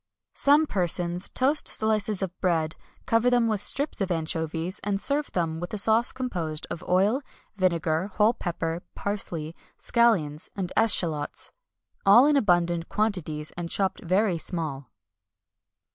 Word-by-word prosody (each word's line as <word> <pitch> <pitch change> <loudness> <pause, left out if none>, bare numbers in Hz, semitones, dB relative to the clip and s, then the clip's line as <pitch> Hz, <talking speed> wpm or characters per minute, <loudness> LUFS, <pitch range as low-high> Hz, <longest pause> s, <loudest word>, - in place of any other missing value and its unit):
Some 290 +3 +4
persons 175 - -1
toast 280 +4 +4
slices 215 -2 0
of 185 -1 -5
bread, 165 -3 0 0.3
cover 230 +2 +2
them 245 -2 +2
with 215 -3 -1
strips 280 +2 0
of 195 - -1
anchovies, 165 +2 -2
and 200 -1 -1
serve 285 +6 +1
them 165 -2 -2
with 175 +4 -5
a - - -3
sauce 220 +3 +4
composed 170 -12 -3
of 165 - -5
oil, 200 +9 +2 0.3
vinegar, 170 -2 0
whole 215 +2 +3
pepper, 170 -3 -4
parsley, 170 -6 -3 0.2
scallions, 185 -11 +1
and 185 -3 -4
eschalots, 165 -9 +2 0.5
all 205 +7 +7
in 295 0 +3
abundant 175 -8 +1
quantities, 170 -8 -1
and 170 -1 -6
chopped 195 +1 -1
very 185 0 +1
small. 155 -7 -3
185 Hz, 135 wpm, -26 LUFS, 165-220 Hz, 0.5 s, all